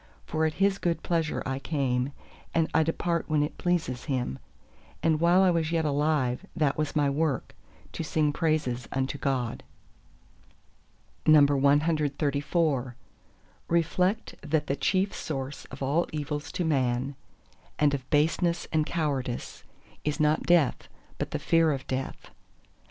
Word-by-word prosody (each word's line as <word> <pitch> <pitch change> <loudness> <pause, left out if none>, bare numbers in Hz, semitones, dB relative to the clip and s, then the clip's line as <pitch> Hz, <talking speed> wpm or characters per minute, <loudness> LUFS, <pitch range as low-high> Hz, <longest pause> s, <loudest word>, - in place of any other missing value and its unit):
For 160 0 0
at 155 - -4
His 195 0 +2
good 170 -1 -1
pleasure 165 -3 0
I 135 0 -2
came; 135 -3 -1 0.4
and 165 -1 +3
I 160 - +4
depart 170 +1 0
when 150 -1 +3
it 150 - -5
pleases 165 -8 -1
Him; 125 - -2 0.6
and 160 -2 +3
while 175 +3 +5
I 185 - +5
was 165 -2 0
yet 165 -1 +1
alive 145 -2 +1
that 150 -4 +1
was 155 -1 -2
my 145 -1 +3
work, 140 -2 -1 0.4
to - - -4
sing 150 -1 +1
praises 145 -7 0
unto 135 +1 -2
God! 130 -4 -1 1.7
CXXXV 145 -1 +3 0.7
Reflect 180 +5 +1
that 150 0 0
the 140 - -1
chief 185 +8 +1
source 135 -2 -5
of 135 +1 -8
all 150 +6 +1
evils 150 -1 -4
to 180 -2 -1
Man, 130 -3 0 0.6
and 150 -1 +3
of 130 -2 -4
baseness 170 +3 +1
and 155 -1 +2
cowardice, 140 -7 -2 0.4
is 150 +1 -1
not 155 +1 +2
death, 170 -6 +3 0.3
but - - -2
the - - -2
fear 165 -1 +3
of 135 -2 -3
death. 130 0 -5
150 Hz, 140 wpm, -28 LUFS, 135-165 Hz, 1.7 s, while